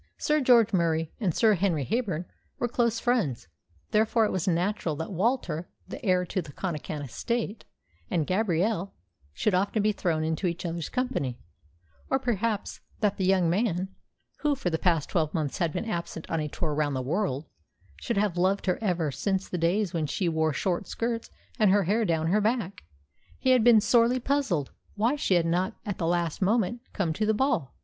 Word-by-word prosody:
Sir 300 0 +1
George 235 -4 +5
Murie 165 -3 +1
and 200 -7 +1
Sir 220 +6 +4
Henry 170 -7 0
Heyburn 200 - -1 0.3
were 240 - 0
close 235 -1 +1
friends; 200 - 0 0.4
therefore 220 +1 +3
it - - -1
was 185 -2 -2
but 180 - +4
natural 175 -2 -1
that 160 +6 -5
Walter, 185 -4 -1 0.2
the 290 - -8
heir 185 -3 +2
to 185 - -2
the 155 -4 -10
Connachan 155 -2 -4
estate, 225 - -3 0.4
and 160 -3 +1
Gabrielle 195 0 0 0.4
should 200 - 0
often 200 +3 +1
be 215 - +3
thrown 170 -6 -1
into 160 +4 -1
each 170 +1 -3
other's 170 -2 -3
company, 240 - -2 0.7
or 265 - +3
perhaps 230 -4 -2 0.2
that 205 -2 +1
the 190 - 0
young 185 -2 +3
man 185 0 0 0.5
who 295 -1 +1
for 185 -10 -2
the 160 - 0
past 165 -5 +2
twelve 160 -1 0
months 150 -4 -2
had 170 -3 +1
been 225 - -3
absent 170 -6 -4
on 165 - +1
a 150 - -1
tour 155 +1 -3
round 145 -2 0
the 130 - -1
world 155 -1 -1 0.5
should 80 - -3
have 200 -3 +1
loved 190 +3 +1
her 180 - +1
ever 175 -7 0
since 195 +5 -1
the - - -5
days 180 +3 +1
when 160 -3 -1
she 185 +4 -1
wore 160 -1 +1
short 175 +4 -1
skirts 230 0 -3 0.3
and 215 -3 +5
her 200 +1 +4
hair 215 +6 +1
down 160 -3 +1
her 200 +6 +2
back. 210 - -1 0.5
He 260 - +2
had 250 -3 +5
been 235 -2 +7
sorely 240 +3 +4
puzzled 250 - 0 0.2
why 230 +7 +2
she 200 -10 +1
had 170 -1 +3
not 175 +3 0
at 205 -3 -4
the 165 - 0
last 170 -1 0
moment 225 +3 +1
come 175 -6 -1
to 215 +7 -1
the 220 - +3
ball. 210 - 0
185 Hz, 195 wpm, -27 LUFS, 165-220 Hz, 0.7 s, been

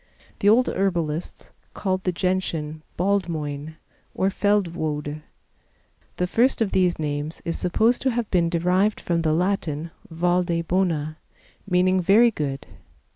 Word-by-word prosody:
The 205 - +4
old 240 +4 +5
herbalists 175 -4 -2 0.2
called 185 -1 -2
the 180 - +2
Gentian 170 -4 -2 0.2
Baldmoyne, 160 -6 -1 0.4
or 190 +1 +1
Feldwode. 160 -8 -1 1.0
The 180 - +1
first 235 +8 +2
of 220 -4 0
these 180 -2 +2
names 150 +1 -3
is 165 - -1
supposed 220 +7 +2
to 265 - +2
have 240 -2 -1
been 170 -3 +2
derived 180 +5 +1
from 170 -1 -1
the 160 -1 +1
Latin 165 -2 -1 0.2
valde 175 0 0
bona, 165 -4 0 0.5
meaning 185 +1 +3
very 220 +6 +5
good. 140 -7 -4
180 Hz, 130 wpm, -24 LUFS, 155-195 Hz, 1.0 s, old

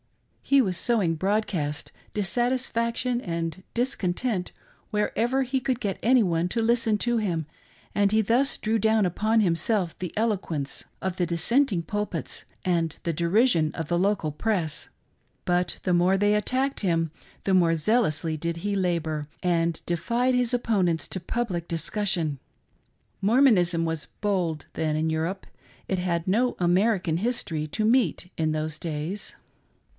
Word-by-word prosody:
He 275 -1 +4
was 185 -4 -1
sow 235 +4 +1
ing 165 -3 +1
broadcast 175 -5 -1 0.2
dissatisfaction 240 +3 0
and 170 0 -4
discontent 220 -4 -1 0.4
wherever 235 +5 +1
he 260 +1 -1
could 255 -2 -1
get 200 -6 -2
any 250 0 +5
one 170 -1 0
to 230 - 0
listen 230 -1 +2
to 240 +2 +1
him, 170 -7 -1 0.5
and 205 -1 +4
thus 230 +6 +2
he - - -12
drew 220 +1 +1
down 220 0 +3
upon 215 +5 +1
himself 180 0 +1
the 180 -2 -4
eloquence 185 -10 -1 0.2
of 190 -1 -2
the 180 - 0
dissenting 190 - +2
pulpits 205 +5 -3 0.2
and 165 -3 +1
the 170 - -1
deri 175 +9 +3
sion 160 -11 +2
of 165 -2 -4
the 175 - +2
local 195 -5 +1
press. 170 -2 -1 0.6
But 175 0 +1
the 180 - +1
more 180 +2 +4
they 205 +1 +3
attacked 255 +6 0
him 165 -5 +1 0.3
the 195 - +1
more 170 -3 +4
zealously 165 -3 +1
did 170 +2 -3
he 205 +4 -2
labor, 165 -5 -1 0.2
and 170 -2 +1
defied 235 +10 +1
his 250 -1 +1
opponents 190 -10 +1
to 190 - -4
public 180 -4 -2
discussion. 165 -3 -1 0.8
Mormonism 195 -7 +4
was 160 -2 -3
bold 180 -7 -1
then 155 -1 -1
in 160 +1 0
Europe 165 +5 -2 0.4
^it 190 - 0
had 175 -1 -1
no 240 +6 +2
American 180 -1 +2
history 175 -8 -2
to 215 +8 -1
meet 220 - +2
in 155 -1 0
those 155 0 -3
days. 165 +5 -4
185 Hz, 150 wpm, -26 LUFS, 165-225 Hz, 0.8 s, any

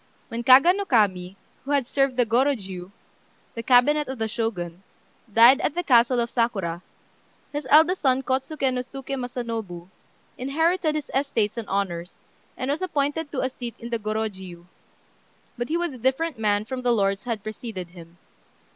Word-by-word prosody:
When 230 +1 -4
Kaga 265 +8 +7
no 400 +1 -2
Kami, 195 - +1 0.3
who 275 - -10
had 280 -3 +2
served 275 +1 +1
in - - -18
the 245 - +4
Gorôjiu, 220 -7 -1 0.6
the 230 - -5
cabinet 270 +5 +4
of 265 0 -5
the 220 -1 -1
Shogun, 195 -6 -4 0.5
died 235 +5 +7
at 300 - -1
the 350 - -1
castle 245 -3 +4
of 235 0 -1
Sakura, 195 -8 -1 0.7
his 290 -2 -4
eldest 325 +5 +5
son 265 -1 +2
Kôtsuké 265 +1 -1
no 250 - -1
Suké 270 +1 -8
Masanobu 230 -8 -5 0.5
inherited 320 +5 +1
his 300 -2 -4
estates 255 -6 0
and 230 -3 -5
honours, 180 -3 -2 0.4
and 260 +2 -2
was 295 - -2
appointed 295 -3 -1
to 265 - -2
a 260 - 0
seat 240 -2 -7
in 235 +1 -9
the 230 - -1
Gorôjiu; 200 -5 -4 0.9
but 240 +1 -4
he 330 - +1
was 345 -4 -2
a 255 - -10
different 265 +3 0
man 210 -1 +1
from 255 +2 -5
the 245 -1 +1
lords 200 -3 +1
who - - -7
had 220 -4 -3
preceded 215 -5 -6
him. 170 -1 -14
245 Hz, 175 wpm, -24 LUFS, 210-275 Hz, 0.9 s, Kaga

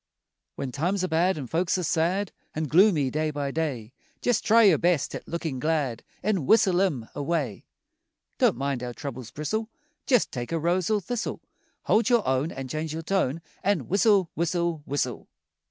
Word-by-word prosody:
When 135 - -4
times 175 +8 -1
are - - +1
bad 170 +2 +2
an' 140 - -4
folks 170 +8 0
are 180 - -2
sad 175 +5 0 0.2
An' 155 - -1
gloomy 155 -3 +4
day 155 +2 0
by 145 -2 -3
day, 135 -8 -3 0.3
Jest 245 -3 +1
try 230 +1 +5
your 190 -8 +6
best 175 -4 +1
at - - -7
lookin' 160 -6 -3
glad 145 -5 -1 0.2
An' 190 -8 0
whistle 190 -5 +4
'em 140 -13 0
away. 145 - -2 0.7
Don't - - +3
mind 135 -1 -2
how 125 -1 -4
troubles 125 -1 -7
bristle, 215 - -3 0.4
Jest 250 -5 +3
take 120 +1 -5
a 165 - +1
rose 170 +2 +1
or 215 -2 +2
thistle. 240 +4 -3 0.4
Hold 215 0 +3
your 240 -3 +3
own 130 +4 +1
An' 135 0 -6
change 155 +3 -3
your 165 +1 -5
tone 165 -4 0 0.2
An' 190 - 0
whistle, 195 -2 +3
whistle, 170 -1 -1
whistle! 130 -4 -2
160 Hz, 175 wpm, -26 LUFS, 140-190 Hz, 0.7 s, your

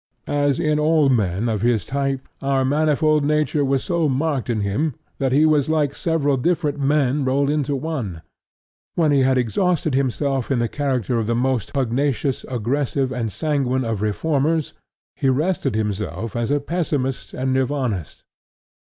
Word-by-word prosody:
As 145 -1 +1
in 155 -2 +1
all 155 -2 +3
men 105 -3 +1
of 110 -3 -1
his 115 -3 +1
type, 135 -1 -2
our 135 -1 +1
manifold 155 +1 +2
nature 150 0 +1
was 135 -1 +1
so 170 -4 +1
marked 135 -1 -1
in 110 -3 0
him 115 +9 -1 0.2
that 135 -2 +1
he 145 +4 +4
was 150 -2 +3
like 150 -3 +1
several 145 -5 +1
different 150 0 0
men 140 0 +2
rolled 140 +2 +1
into 145 -2 0
one. 130 - -4 0.7
When 160 -3 +3
he 140 - +4
had 130 0 +3
exhausted 155 - +1
himself 135 0 0
in 135 - +1
the 120 0 +1
character 130 -4 -1
of 110 - -2
the 115 - +1
most 125 -2 0
pugnacious, 135 +1 0
aggressive, 130 +2 -1
and 120 -4 -2
sanguine 135 - 0
of 110 -3 -2
reformers, 150 +8 0 0.4
he 135 - +1
rested 145 - 0
himself 105 +1 -3
as 120 0 -1
a 145 +1 +2
Pessimist 145 -4 -2
and 130 0 -1
Nirvanist. 130 - -2
135 Hz, 160 wpm, -21 LUFS, 125-150 Hz, 0.7 s, he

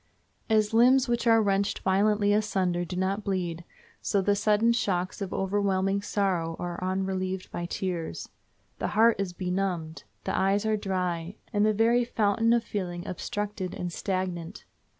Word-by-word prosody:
As 215 -1 +2
limbs 255 +3 +5
which 240 0 0
are 225 -1 +5
wrenched 200 0 +1
violently 205 +2 +2
asunder 190 -4 +1
do 180 +1 -6
not 190 +3 -1
bleed, 175 -4 -2 0.4
so 200 - +1
the 200 +1 +2
sudden 215 +3 +3
shocks 185 -5 -1
of 195 - -3
overwhelming 195 0 0
sorrow 185 -5 -1
are 175 0 -5
unrelieved 190 0 -2
by 175 - -4
tears. 175 -2 -4 0.5
The - - -1
heart 230 +1 +5
is 195 -2 -1
benumbed. 180 -3 -3 0.2
The - - -2
eyes 195 +2 +2
are 220 0 +2
dry, 185 -3 -2 0.2
and 205 0 +2
the 215 - +4
very 230 +3 +3
fountain 225 -1 +1
of 235 -1 +3
feeling 180 -5 -4
obstructed 205 +1 -4
and 175 -1 -4
stagnant. 185 -1 -3
195 Hz, 150 wpm, -27 LUFS, 180-210 Hz, 0.5 s, limbs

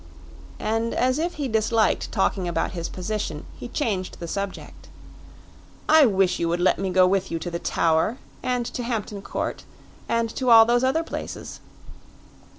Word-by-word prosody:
And 225 +1 -1
as 255 +3 +1
if 345 +2 -2
he 290 -2 -2
disliked 220 -1 +1
talking 190 -2 0
about 170 -1 -1
his 170 -2 -4
position, 185 -5 -4
he - - -6
changed 210 -9 -2
the 170 - -5
subject. 200 +2 -6 1.0
"I 310 -3 +7
wish 195 -3 +2
you 170 - 0
would 170 +1 0
let 180 - +3
me 195 -1 -1
go 185 0 +5
with 190 +1 +1
you 165 - -2
to 175 +1 -5
the 170 - -3
Tower, 165 +10 +1 0.2
and 250 -1 -1
to 245 - -4
Hampton 220 -4 -3
Court, - - -4 0.5
and 230 0 +1
to 255 -2 0
all 225 -1 +9
those 240 +2 +2
other 280 +6 +2
places." - - -7
215 Hz, 165 wpm, -24 LUFS, 185-240 Hz, 1.0 s, all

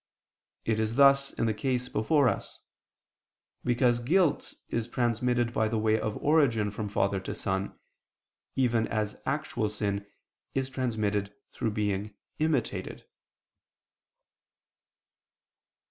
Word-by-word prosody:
It 110 -1 +1
is 110 +1 0
thus 140 0 +5
in - - -1
the 110 - +1
case 125 +1 -1
before 130 +6 +2
us: - - -2 1.1
because 120 0 +2
guilt 160 +6 +1
is 115 -1 -2
transmitted 120 0 0
by 110 - +2
the 110 +1 -1
way 110 0 +2
of 110 -1 -2
origin 130 -9 +3
from 105 0 -4
father 100 -1 +1
to 95 - -5
son, 95 0 -2 0.8
even 120 -3 +2
as 110 -2 -2
actual 130 -7 -1
sin 100 -1 -2 0.5
is 135 0 -1
transmitted 105 -6 -1 0.2
through 110 - -2
being 105 -1 -2 0.2
imitated. 155 -6 -1
115 Hz, 115 wpm, -29 LUFS, 105-130 Hz, 1.1 s, thus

